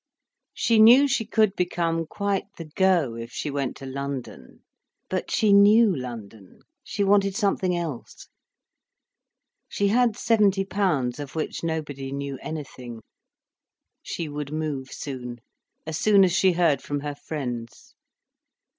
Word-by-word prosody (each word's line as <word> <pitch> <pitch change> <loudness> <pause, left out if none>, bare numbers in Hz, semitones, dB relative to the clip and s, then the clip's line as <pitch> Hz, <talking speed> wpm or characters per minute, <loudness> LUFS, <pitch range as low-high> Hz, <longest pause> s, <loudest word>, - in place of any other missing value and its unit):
She 230 -2 +2
knew 245 +6 +8
she 260 -4 0
could 215 -3 +2
become 165 -2 -1
quite 200 0 -2
the 165 - -7
"go' 165 -5 +1
if 115 +1 -8
she 145 - -4
went 140 -2 -3
to 135 - -10
London. 135 - -7 0.5
But - - -2
she 210 -2 +3
knew 205 0 +6
London, 115 -6 -9 0.2
she 200 - -2
wanted 195 -1 +3
something 195 -4 0
else. 160 -8 -6 1.4
She 200 0 0
had 235 0 +2
seventy 205 -5 +2
pounds, 150 -11 -1
of 145 0 -7
which 160 - -4
nobody 145 -5 -4
knew 140 -1 -5
anything. 125 -7 -7 1.0
She 165 - -5
would 145 -1 -6
move 150 -4 -4
soon, 125 -4 -7 0.5
as 160 -1 -4
soon 205 -2 +5
as 185 - +3
she 190 0 +3
heard 165 -6 +2
from 145 -1 -4
her 145 0 -4
friends. 125 -6 -7
160 Hz, 135 wpm, -25 LUFS, 135-200 Hz, 1.4 s, knew